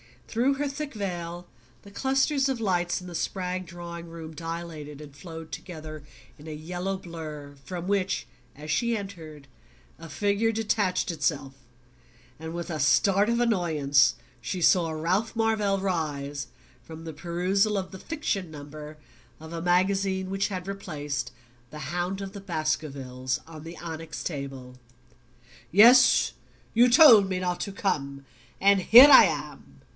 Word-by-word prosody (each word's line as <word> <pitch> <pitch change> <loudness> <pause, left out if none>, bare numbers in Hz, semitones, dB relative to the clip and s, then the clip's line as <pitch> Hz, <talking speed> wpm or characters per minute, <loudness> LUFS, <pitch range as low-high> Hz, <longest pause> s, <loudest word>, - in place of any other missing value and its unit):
Through 245 +5 +1
her 290 +1 -2
thick 285 +1 -6
veil 175 -4 -5 0.4
the 200 - -15
clusters 270 +4 +1
of 260 -4 -2
lights 175 -4 0
in 180 - -10
the 175 - -8
Spragg 185 +1 -3
drawing 170 0 -8
room 165 -1 -9
dilated 160 -2 -7
and 145 -2 -12
flowed 160 0 -10
together 155 -2 -8 0.4
in 150 - -12
a 155 - -6
yellow 180 +5 -4
blur, 155 -5 -9
from 175 +3 -5
which, 190 -9 0 0.3
as 150 +2 -7
she 235 +9 +1
entered, 160 -8 -9 0.5
a 165 0 -10
figure 205 +4 0
detached 205 -5 0
itself; 145 -4 -2 0.9
and 160 +1 -7
with 170 +1 -5
a 155 - -3
start 195 +7 +3
of 235 +1 +1
annoyance 150 - +2 0.2
she 180 +9 -4
saw 170 0 +4
Ralph 175 +9 -1
Marvell 215 -3 +1
rise 145 -7 -3 0.3
from 160 0 -11
the 160 -1 -7
perusal 185 +6 0
of 190 -1 -4
the 190 - -9
"fiction 205 - -3
number" 150 0 -10 0.4
of 160 +1 -11
a 165 -1 -5
magazine 190 +2 +1
which 195 +1 0
had 185 -3 -5
replaced 150 -9 -4 0.4
"The 150 -2 -7
Hound 180 +3 -2
of 195 -1 -6
the 200 0 -9
Baskervilles" 140 -7 -3
on 160 -2 -11
the 165 +1 -9
onyx 165 -1 -7
table. 135 -4 -6 0.9
"Yes; 240 +6 +7 0.4
you 240 +2 +5
told 235 -7 +8
me 185 -1 -1
not 180 -1 -2
to 200 - -4
come 140 -9 -2 0.4
and 200 0 +5
here 245 +9 +9
I 265 - +10
am." - - -4
175 Hz, 150 wpm, -26 LUFS, 155-200 Hz, 0.9 s, I